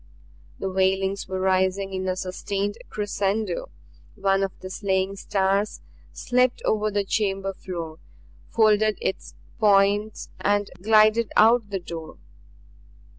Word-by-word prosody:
The 195 Hz, -, -3 dB
wailings 190 Hz, +1 st, 0 dB
were 190 Hz, 0 st, -3 dB
rising 190 Hz, +1 st, +1 dB
in 185 Hz, 0 st, -3 dB
a 185 Hz, -, 0 dB
sustained 195 Hz, +2 st, -3 dB
crescendo. 210 Hz, -, -2 dB, 0.5 s
One 195 Hz, -1 st, +1 dB
of 195 Hz, -1 st, 0 dB
the 185 Hz, -, -8 dB
slaying 190 Hz, -1 st, -1 dB
stars 195 Hz, +1 st, 0 dB, 0.3 s
slipped 250 Hz, 0 st, +1 dB
over 215 Hz, 0 st, +1 dB
the 205 Hz, -1 st, -1 dB
chamber 195 Hz, -2 st, -1 dB
floor, 170 Hz, -4 st, -7 dB, 0.5 s
folded 215 Hz, -2 st, +3 dB
its 190 Hz, -, -4 dB, 0.2 s
points 205 Hz, 0 st, +2 dB
and 205 Hz, 0 st, +1 dB
glided 215 Hz, +2 st, +4 dB
out 225 Hz, -1 st, +5 dB
the 195 Hz, -1 st, -2 dB
door. 165 Hz, -2 st, -8 dB
195 Hz, 120 wpm, -24 LUFS, 190-215 Hz, 0.5 s, out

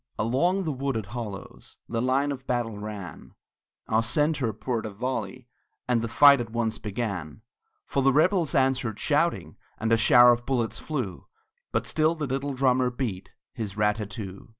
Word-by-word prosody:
Along 170 Hz, -, +1 dB
the 160 Hz, -, -1 dB
wooded 135 Hz, -5 st, -2 dB
hollows 105 Hz, -2 st, -8 dB
The 115 Hz, -1 st, -2 dB
line 135 Hz, +3 st, +1 dB
of 135 Hz, -1 st, -7 dB
battle 115 Hz, -4 st, -2 dB
ran, 105 Hz, -7 st, -8 dB, 0.5 s
Our 110 Hz, +1 st, +2 dB
centre 145 Hz, +1 st, 0 dB
poured 110 Hz, +1 st, -3 dB
a -, -, -5 dB
volley, 125 Hz, +3 st, -4 dB, 0.4 s
And 125 Hz, -2 st, +2 dB
the 115 Hz, -, -2 dB
fight 140 Hz, +3 st, +6 dB
at 115 Hz, -, -6 dB
once 115 Hz, -1 st, -2 dB
began; 100 Hz, -6 st, -4 dB, 0.4 s
For 140 Hz, -, -1 dB
the 135 Hz, +1 st, +4 dB
rebels 165 Hz, +2 st, +2 dB
answered 130 Hz, -5 st, +1 dB
shouting, -, -, 0 dB, 0.2 s
And 110 Hz, +1 st, -2 dB
a -, -, +5 dB
shower 120 Hz, +2 st, +7 dB
of 120 Hz, 0 st, -4 dB
bullets 120 Hz, -4 st, -1 dB
flew; 125 Hz, -, -4 dB, 0.4 s
But -, -, -1 dB
still 160 Hz, +1 st, +1 dB
the 155 Hz, -2 st, -3 dB
little 135 Hz, +1 st, -3 dB
drummer 130 Hz, -1 st, +2 dB
beat 120 Hz, -7 st, -4 dB, 0.2 s
His 110 Hz, -5 st, -5 dB
rat 105 Hz, 0 st, +2 dB
tat 105 Hz, -2 st, -5 dB
too. 100 Hz, -2 st, -8 dB
120 Hz, 170 wpm, -26 LUFS, 110-135 Hz, 0.5 s, shower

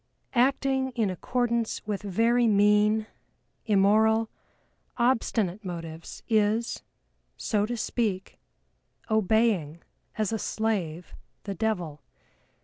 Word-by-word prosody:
Acting 265 Hz, +1 st, +2 dB
in 220 Hz, -5 st, +1 dB
accordance 235 Hz, +4 st, -1 dB
with 205 Hz, -2 st, -3 dB
very 230 Hz, +4 st, +2 dB
mean, 210 Hz, +1 st, +3 dB, 0.6 s
immoral, 220 Hz, +2 st, +3 dB, 0.7 s
obstinate 225 Hz, -5 st, +1 dB
motives 165 Hz, -3 st, -7 dB
is, 220 Hz, +1 st, +1 dB, 0.6 s
so 210 Hz, -2 st, 0 dB
to 240 Hz, +1 st, -3 dB
speak, 210 Hz, -4 st, -2 dB, 0.7 s
obeying 215 Hz, -7 st, +1 dB, 0.3 s
as 215 Hz, 0 st, 0 dB
a 220 Hz, -, -1 dB
slave 185 Hz, -8 st, -2 dB, 0.3 s
the 200 Hz, -, -4 dB
devil. 175 Hz, -8 st, -2 dB
215 Hz, 90 wpm, -27 LUFS, 195-230 Hz, 0.7 s, mean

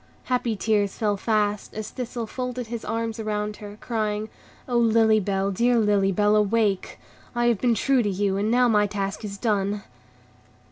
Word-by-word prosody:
Happy 245 Hz, -3 st, 0 dB
tears 205 Hz, -1 st, 0 dB
fell 210 Hz, -2 st, +1 dB
fast, 210 Hz, 0 st, -1 dB
as 215 Hz, 0 st, -5 dB
Thistle 245 Hz, -2 st, -4 dB
folded 250 Hz, +2 st, -4 dB
his 230 Hz, 0 st, -6 dB
arms 225 Hz, 0 st, -3 dB
around 210 Hz, -1 st, -2 dB
her, 205 Hz, 0 st, -10 dB
crying, 215 Hz, -2 st, -2 dB, 0.4 s
"O 245 Hz, -, -2 dB
Lily 225 Hz, -2 st, +4 dB
Bell, 195 Hz, 0 st, -1 dB
dear 240 Hz, +5 st, +2 dB
Lily 205 Hz, -3 st, +3 dB
Bell, 210 Hz, +2 st, +3 dB
awake! 210 Hz, -2 st, +1 dB, 0.4 s
I 240 Hz, 0 st, +1 dB
have 235 Hz, -4 st, +2 dB
been 240 Hz, -2 st, +3 dB
true 270 Hz, +2 st, +2 dB
to 210 Hz, -, 0 dB
you, 195 Hz, 0 st, 0 dB
and 205 Hz, +2 st, 0 dB
now 245 Hz, +1 st, +4 dB
my 210 Hz, -3 st, +3 dB
task 195 Hz, +1 st, -4 dB
is 200 Hz, -1 st, -5 dB
done." 205 Hz, -2 st, 0 dB
215 Hz, 175 wpm, -24 LUFS, 205-230 Hz, 0.4 s, Lily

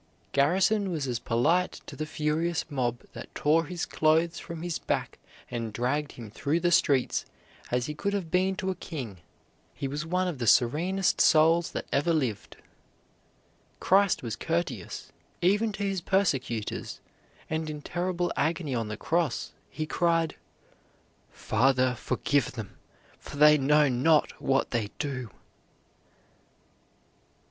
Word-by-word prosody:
Garrison 190 Hz, +8 st, +2 dB
was 160 Hz, -6 st, -2 dB
as 120 Hz, -2 st, -2 dB
polite 155 Hz, +12 st, +1 dB
to -, -, -9 dB
the 155 Hz, -, -4 dB
furious 160 Hz, +2 st, -1 dB
mob 120 Hz, -3 st, -1 dB
that -, -, -10 dB
tore 160 Hz, +3 st, +3 dB
his 175 Hz, +2 st, -4 dB
clothes 160 Hz, +2 st, +2 dB
from 170 Hz, -1 st, -7 dB
his 175 Hz, -2 st, -2 dB
back -, -, -2 dB, 0.3 s
and 115 Hz, -2 st, -3 dB
dragged 135 Hz, +7 st, -1 dB
him 115 Hz, -4 st, -10 dB
through 145 Hz, +8 st, 0 dB
the 175 Hz, 0 st, +1 dB
streets 145 Hz, -7 st, +3 dB, 0.5 s
as 125 Hz, 0 st, 0 dB
he 150 Hz, -, -4 dB
could 200 Hz, +7 st, -2 dB
have 185 Hz, -5 st, -3 dB
been 190 Hz, +1 st, +2 dB
to 190 Hz, -2 st, -2 dB
a -, -, -4 dB
king. 130 Hz, -, -7 dB, 0.6 s
He 135 Hz, -, -3 dB
was 145 Hz, +3 st, -3 dB
one 180 Hz, +2 st, 0 dB
of 165 Hz, -7 st, -4 dB
the 115 Hz, -, -2 dB
serenest 175 Hz, -, +3 dB
souls 165 Hz, +2 st, +5 dB
that -, -, -3 dB
ever 155 Hz, +5 st, +2 dB
lived. 120 Hz, -10 st, -2 dB, 1.2 s
Christ 195 Hz, -4 st, +3 dB
was 115 Hz, -3 st, -3 dB
courteous, 165 Hz, +7 st, -3 dB, 0.3 s
even 205 Hz, +5 st, +2 dB
to 205 Hz, -, -4 dB
His 195 Hz, -2 st, -1 dB
persecutors, 135 Hz, -, -1 dB, 0.5 s
and 160 Hz, 0 st, -2 dB
in 150 Hz, -1 st, -6 dB
terrible 175 Hz, 0 st, -1 dB
agony 160 Hz, -2 st, -1 dB
on 115 Hz, -3 st, -1 dB
the 105 Hz, 0 st, -5 dB
cross, 165 Hz, -3 st, -1 dB, 0.2 s
He 155 Hz, -, -4 dB
cried: 165 Hz, 0 st, +1 dB, 0.9 s
"Father, 130 Hz, +2 st, +2 dB
forgive 135 Hz, +2 st, 0 dB
them, 110 Hz, -6 st, -7 dB, 0.4 s
for -, -, -10 dB
they 150 Hz, +1 st, +8 dB
know 150 Hz, +1 st, +4 dB
not 145 Hz, +5 st, +3 dB
what 135 Hz, 0 st, +1 dB
they 115 Hz, -4 st, -1 dB
do." 130 Hz, -5 st, -4 dB
155 Hz, 140 wpm, -28 LUFS, 130-175 Hz, 1.2 s, they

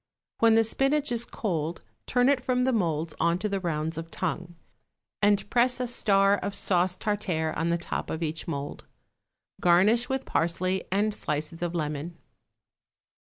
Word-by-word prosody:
When 225 Hz, -1 st, +5 dB
the 225 Hz, -, +5 dB
spinach 275 Hz, +5 st, +1 dB
is 235 Hz, 0 st, 0 dB
cold 170 Hz, -8 st, -3 dB, 0.2 s
turn 245 Hz, 0 st, +3 dB
it 275 Hz, -3 st, +2 dB
from 250 Hz, -1 st, +1 dB
the 260 Hz, 0 st, +2 dB
moulds 165 Hz, -6 st, 0 dB
on 170 Hz, +1 st, +2 dB
to 210 Hz, -, -2 dB
the 200 Hz, -1 st, -1 dB
rounds 160 Hz, -2 st, -2 dB
of 165 Hz, 0 st, -7 dB
tongue, 175 Hz, 0 st, -4 dB, 0.7 s
and 205 Hz, -1 st, +3 dB
press 250 Hz, +1 st, +3 dB
a 250 Hz, -, 0 dB
star 200 Hz, -4 st, +3 dB
of 200 Hz, -, -4 dB
sauce 180 Hz, -2 st, +1 dB
tartare 185 Hz, -7 st, -1 dB
on 165 Hz, +2 st, 0 dB
the 170 Hz, -, +2 dB
top 170 Hz, -, -4 dB
of 160 Hz, +1 st, -3 dB
each 160 Hz, 0 st, -3 dB
mould. 145 Hz, -3 st, -5 dB, 0.7 s
Garnish 200 Hz, +8 st, +4 dB
with 265 Hz, 0 st, -2 dB
parsley 185 Hz, +3 st, 0 dB
and 210 Hz, +2 st, +1 dB
slices 155 Hz, -2 st, -3 dB
of 175 Hz, 0 st, -2 dB
lemon. 155 Hz, +1 st, -3 dB
185 Hz, 165 wpm, -27 LUFS, 165-225 Hz, 0.7 s, When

